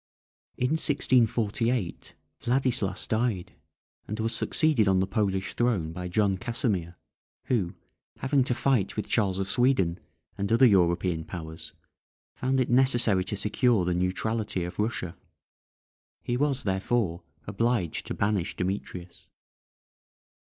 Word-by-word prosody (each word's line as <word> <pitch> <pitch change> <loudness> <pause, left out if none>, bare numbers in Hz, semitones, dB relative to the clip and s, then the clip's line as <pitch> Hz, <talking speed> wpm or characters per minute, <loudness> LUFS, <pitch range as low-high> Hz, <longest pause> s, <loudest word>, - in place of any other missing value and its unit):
In 125 +2 0
1648 120 - +1 0.2
Vladislas 120 -6 0
died, 110 -5 -1 0.5
and 105 +1 -5
was 115 +1 -1
succeeded 150 -9 +2
on 95 -1 +4
the 95 - +2
Polish 95 -2 -1
throne 110 -10 0
by 90 +1 -5
John 95 +1 +1
Casimir, 105 -8 -2 0.5
who, 100 -7 -1 0.4
having 135 0 +2
to 125 - 0
fight 125 -8 +1
with 105 - -2
Charles 100 -5 +1
of 95 0 -2
Sweden, 95 -7 +2 0.4
and 100 +2 -1
other 115 +3 +6
European 90 -5 +3
powers, 80 -2 -8 0.6
found 130 +1 0
it 130 - +2
necessary 120 -6 +3
to 105 - -3
secure 105 0 +2
the 90 - +1
neutrality 95 +2 -1
of 90 +3 -7
Russia; 105 -5 -2 1.1
he 120 - -1
was, 135 -1 0
therefore, 95 -2 0 0.2
obliged 105 -4 -1
to - - -4
banish 100 -4 0
Demetrius. 90 -2 -5
105 Hz, 125 wpm, -27 LUFS, 90-120 Hz, 1.1 s, other